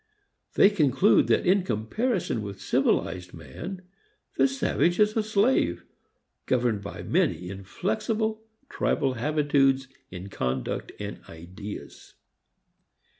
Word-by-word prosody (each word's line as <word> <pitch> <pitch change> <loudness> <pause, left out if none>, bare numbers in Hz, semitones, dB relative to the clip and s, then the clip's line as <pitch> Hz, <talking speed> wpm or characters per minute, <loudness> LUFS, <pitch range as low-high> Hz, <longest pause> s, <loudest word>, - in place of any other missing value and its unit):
They 200 - +6
conclude 155 0 +4
that - - +2
in 190 +2 +4
comparison 180 - -1
with 100 -2 -7
civilized 90 -1 0
man 180 - -8 0.5
the 135 - +4
savage 135 +6 0
is 210 0 +4
a 220 - +3
slave, 205 - +1 0.6
governed 120 -5 +1
by 100 - -7
many 90 +1 0
inflexible 215 - -2 0.2
tribal 135 - 0
habitudes 135 0 +2 0.2
in 90 +2 -8
conduct 65 -6 -3
and - - -6
ideas. 90 +6 -10
135 Hz, 105 wpm, -26 LUFS, -, 0.6 s, They